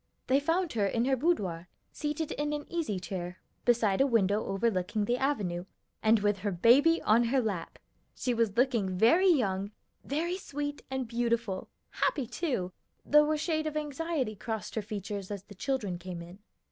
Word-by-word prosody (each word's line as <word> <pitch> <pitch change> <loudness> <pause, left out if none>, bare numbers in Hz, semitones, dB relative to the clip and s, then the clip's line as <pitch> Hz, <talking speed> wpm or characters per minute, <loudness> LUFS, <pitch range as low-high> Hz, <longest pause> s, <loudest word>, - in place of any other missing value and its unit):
They 265 +2 +3
found 330 +3 0
her 205 -3 +1
in 230 +4 0
her 265 0 +3
boudoir, 200 - 0 0.2
seated 300 +1 -3
in 295 0 -2
an 295 0 -3
easy 300 - -1
chair, 180 -1 -5 0.3
beside 225 -3 +3
a 275 - +5
window 215 -4 +2
overlooking 205 0 0
the 245 +3 0
avenue, 195 -11 -1 0.4
and 220 -1 +4
with 205 -1 +1
her 205 +2 -1
baby 265 - +5
on 230 +3 +4
her 260 +3 +2
lap. 210 -8 -3 0.4
She 250 - -1
was 230 -3 0
looking 230 -8 +2
very 335 - +5
young, 200 - +1 0.3
very 335 +6 -1
sweet 290 -4 -4
and 265 -2 -2
beautiful, 235 -4 -1 0.2
happy, 275 -5 0
too, 240 - -2 0.3
though 300 +1 +5
a 310 - +1
shade 315 0 -1
of 305 0 -3
anxiety 295 -5 -2
crossed 220 +2 -5
her 220 - -1
features 205 -1 -5
as 200 -2 -5
the 205 - -13
children 205 -5 -2
came 175 -1 -6
in. 175 +3 -12
230 Hz, 170 wpm, -30 LUFS, 200-290 Hz, 0.4 s, a